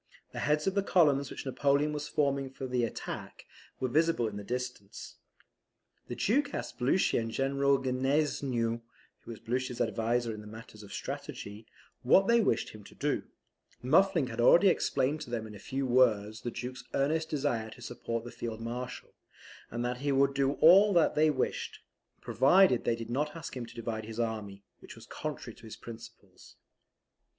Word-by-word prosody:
The - - -6
heads 150 +1 +1
of 195 - +1
the 200 - +2
columns 145 -8 +3
which - - -7
Napoleon 140 +2 +1
was 150 0 -4
forming 140 -2 0
for 135 0 -7
the 125 -1 0
attack, 115 - -6 0.3
were 130 - 0
visible 155 -2 +2
in 105 - -6
the 105 - -6
distance. 125 -3 -6 0.9
The 120 - -5
Duke 280 - +1
asked - - -6
Blucher 130 +7 +2
and 115 0 -3
General 140 +3 +2
Gneisenau 130 -3 0 0.4
(who - - -16
was 115 - -7
Blucher's 125 +2 -3
adviser 115 +1 0
in 105 0 -9
matters 110 -1 -11
of 100 -1 -12
strategy) 105 +2 -6 0.3
what 135 +10 +5
they 235 +2 +4
wished - - +1
him 105 -1 -12
to - - -14
do, - - -1 0.6
Muffling 165 +3 +4
had 120 -2 -3
already 175 +10 +7
explained 140 -2 0
to - - -7
them 115 -2 -3
in 110 - -10
a 105 - -10
few 135 +5 -3
words 110 -4 +2
the 120 - -3
Duke's 125 +1 -6
earnest 155 +4 +1
desire 135 -7 -1
to 125 - -13
support 115 -1 -4
the 120 - -8
Field 115 -2 -5
Marshal, 120 +2 -6 0.6
and 120 +1 -3
that 125 0 -2
he 140 +2 -1
would 140 0 +3
do 140 0 +1
all 195 +7 +7
that 170 -2 +4
they 155 +1 +4
wished, 135 -4 -2 0.4
provided 140 +1 +4
they 115 - +2
did 115 0 -7
not 150 +5 -1
ask 165 -4 -7
him 120 -2 -5
to - - -14
divide 110 -2 -4
his 110 +1 -7
army, 105 -4 -3 0.2
which - - -12
was - - -13
contrary - - -6
to - - -16
his 110 - -8
principles. 115 -4 -13
125 Hz, 180 wpm, -30 LUFS, 115-145 Hz, 0.9 s, already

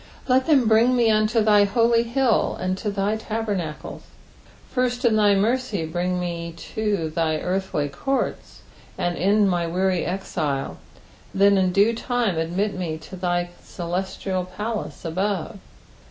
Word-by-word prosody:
"Ltt 260 0 +3
them 275 -7 +4
bring 230 +3 +4
me 235 -2 +4
unto 215 +1 +2
thy 210 -1 +5
holy 230 +3 +3
hilt, 235 0 +1
and 185 0 -1
to 215 - -2
thy 200 +1 0
tabemaelei." 210 -8 -4 0.7
First 250 0 0
in 225 -2 +4
thy 205 -2 +4
mercy 220 -3 0
brine 180 +3 -1
me 170 -1 -4 0.2
to 205 -7 -1
thine 155 -1 0
earthly 185 -5 -1
courts, 265 - -3 0.4
and 175 0 -1
end 200 +4 +3
my 175 -2 0
weary 185 +1 0
exile, 155 -7 -3 0.5
and 190 - -3
then 200 0 +6
in 185 -1 +2
due 205 +5 +4
time 230 -6 -1
admit 185 +6 -1
me 170 -4 -3
to 160 +4 -11
thy 175 -1 -1
celestial 185 +1 -3
palace 210 +2 -5
above. 190 +3 -2
195 Hz, 145 wpm, -23 LUFS, 175-220 Hz, 0.7 s, then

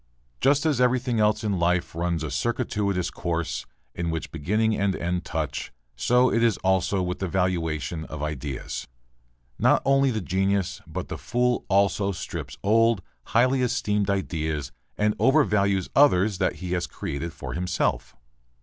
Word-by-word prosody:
Just 145 +3 +3
as 145 -6 +2
everything 125 -1 +2
else 105 0 +2
in 100 -4 0
life 90 +1 +1
runs 85 -1 -1
a 75 - -4
circuitous 100 +1 -1
course, 85 -2 -3 0.3
in 85 -1 -3
which 80 -1 -4
beginning 105 +8 +1
and 100 -2 +1
end 90 +1 -2
touch, 75 -3 -3 0.2
so 125 - +3
is 115 -2 +3
it - - -12
also 95 0 +2
with 90 0 -3
the 95 - -1
valuation 80 -5 -1
of 75 -1 -6
ideas. 70 -5 -4 0.7
Not - - +4
only 135 0 +4
the 110 -3 -1
genius, 95 0 0
but 85 +3 -5
the 80 - -5
fool 120 - 0
also 100 0 +2
strips 85 - -6
old, 115 -1 +3 0.2
highly 130 +4 +3
esteemed 105 -5 0
ideas 80 -6 -2 0.3
and 105 0 +2
overvalues 100 -9 +3
others 105 -8 +4
that 95 - +1
he 90 -1 -6
has 90 -1 0
created 80 +4 -5
for 65 -6 -7
himself. 80 -7 -1
95 Hz, 150 wpm, -25 LUFS, 85-110 Hz, 0.7 s, Not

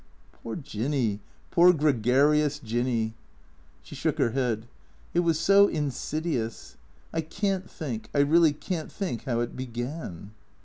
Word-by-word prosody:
" - - -31
Poor 115 - -5
Jinny. 125 - -1 0.3
Poor 175 +1 +7
gregarious 145 0 +3
Jinny." 115 -3 -1 0.7
She - - -12
shook - - -1
her 115 - +2
head. 120 -3 -1 0.2
" 60 0 -30
It 175 - +3
was 165 -3 +2
so 200 +4 +6
insidious. 150 - -3 0.4
I 160 - 0
can't 190 +3 -2
think, 125 -9 -5
I 145 - +3
really 160 +2 +5
can't 160 +2 -5
think 180 - -4
how 120 -3 0
it 120 - -3
began." 120 - -6
140 Hz, 140 wpm, -27 LUFS, 120-160 Hz, 0.7 s, Poor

